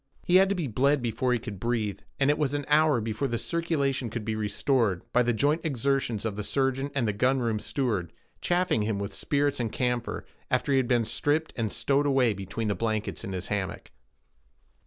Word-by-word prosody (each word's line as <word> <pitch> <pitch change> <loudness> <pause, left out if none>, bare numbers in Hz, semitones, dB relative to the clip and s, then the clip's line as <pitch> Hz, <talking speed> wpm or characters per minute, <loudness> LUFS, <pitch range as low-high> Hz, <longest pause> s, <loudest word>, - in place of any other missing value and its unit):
He 180 - +5
had 190 0 +5
to 200 - +1
be 175 -4 -2
bled 135 +3 +2
before 120 +2 0
he 125 - +3
could 105 -4 -7
breathe, 115 -3 -1 0.2
and 140 +1 +4
it 150 - -1
was 145 -2 +1
an 145 -1 -2
hour 150 -3 +4
before 110 +5 -2
the 120 -2 -1
circulation 140 -6 -1
could 110 -1 -5
be 110 -1 -1
restored, 110 -2 +1
by 125 - +5
the 120 0 +2
joint 145 +8 +1
exertions 135 - 0
of 110 -3 -2
the 105 - -4
surgeon 135 +3 0
and 110 -6 0
gun 130 +1 +3
room 115 -4 0
steward, 105 - -1 0.3
chafing 175 -10 +1
him 105 -1 -1
with 100 0 -4
spirits 145 -1 0
and 115 -3 -1
camphor, 125 -1 -2 0.2
after - - +1
he - - +4
had 130 -2 +2
been 120 -2 +2
stripped 145 +8 0
and 110 -4 -1
stowed 140 +1 +1
away 130 -5 +3
between 100 +3 -4
the 105 - +1
blankets 110 +3 -2
in 100 - -5
his 90 0 -4
hammock. 95 -3 -4
125 Hz, 205 wpm, -27 LUFS, 110-140 Hz, 0.3 s, He